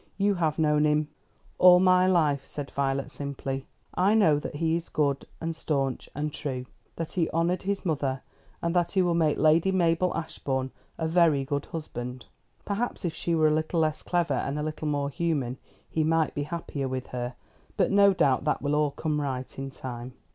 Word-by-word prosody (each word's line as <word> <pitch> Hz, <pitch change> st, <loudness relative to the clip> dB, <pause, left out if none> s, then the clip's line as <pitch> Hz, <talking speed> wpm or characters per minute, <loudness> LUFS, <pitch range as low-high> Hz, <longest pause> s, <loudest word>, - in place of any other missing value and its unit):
You 205 Hz, 0 st, +3 dB
have 160 Hz, -5 st, 0 dB
known 150 Hz, -1 st, +3 dB
him 150 Hz, 0 st, +1 dB, 0.2 s
" -, -, -34 dB
"All 180 Hz, -1 st, +8 dB
my 185 Hz, 0 st, +5 dB
life," 150 Hz, -7 st, +2 dB
said 145 Hz, 0 st, -7 dB
Violet 135 Hz, 0 st, -1 dB
simply. 135 Hz, 0 st, -5 dB, 0.3 s
"I 195 Hz, +4 st, +3 dB
know 160 Hz, -9 st, +4 dB
that 150 Hz, -, -6 dB
he 160 Hz, +2 st, +1 dB
is 170 Hz, 0 st, -4 dB
good, 140 Hz, -2 st, 0 dB
and 165 Hz, 0 st, -3 dB
stanch 135 Hz, -5 st, -2 dB
and 150 Hz, +1 st, -2 dB
true, 130 Hz, -3 st, -4 dB, 0.3 s
that 165 Hz, -1 st, -4 dB
he 170 Hz, -3 st, 0 dB
honoured 170 Hz, +3 st, 0 dB
his 200 Hz, +1 st, -2 dB
mother, 140 Hz, -5 st, -1 dB, 0.4 s
and 170 Hz, +1 st, 0 dB
that 175 Hz, -1 st, +1 dB
he 190 Hz, -2 st, +3 dB
will 175 Hz, -1 st, +2 dB
make 160 Hz, -3 st, +2 dB
Lady 160 Hz, +4 st, +4 dB
Mabel 175 Hz, -1 st, +2 dB
Ashbourne 135 Hz, -5 st, -3 dB, 0.3 s
a 160 Hz, -, -1 dB
very 160 Hz, -5 st, +3 dB
good 145 Hz, 0 st, -2 dB
husband. 125 Hz, -6 st, -6 dB, 0.4 s
Perhaps 205 Hz, 0 st, -2 dB
if 165 Hz, -, -1 dB
she 170 Hz, -, -1 dB
were 155 Hz, -1 st, +4 dB
a -, -, +2 dB
little 155 Hz, +2 st, 0 dB
less 155 Hz, -1 st, 0 dB
clever 175 Hz, -5 st, 0 dB
and 135 Hz, +2 st, -1 dB
a 150 Hz, -, -2 dB
little 155 Hz, 0 st, -4 dB
more 145 Hz, -1 st, -1 dB
human, 140 Hz, -7 st, -1 dB, 0.3 s
he 160 Hz, -, 0 dB
might 160 Hz, 0 st, +2 dB
be 145 Hz, -, -2 dB
happier 150 Hz, -5 st, -3 dB
with 130 Hz, -1 st, -3 dB
her; 125 Hz, 0 st, -3 dB, 0.4 s
but -, -, +2 dB
no 200 Hz, 0 st, +6 dB
doubt 145 Hz, -9 st, +2 dB
that 150 Hz, -, 0 dB
will 145 Hz, 0 st, 0 dB
all 150 Hz, 0 st, +3 dB
come 150 Hz, +1 st, -2 dB
right 130 Hz, -2 st, -4 dB
in 135 Hz, 0 st, -4 dB
time." 125 Hz, -2 st, -7 dB
155 Hz, 200 wpm, -27 LUFS, 140-170 Hz, 0.4 s, All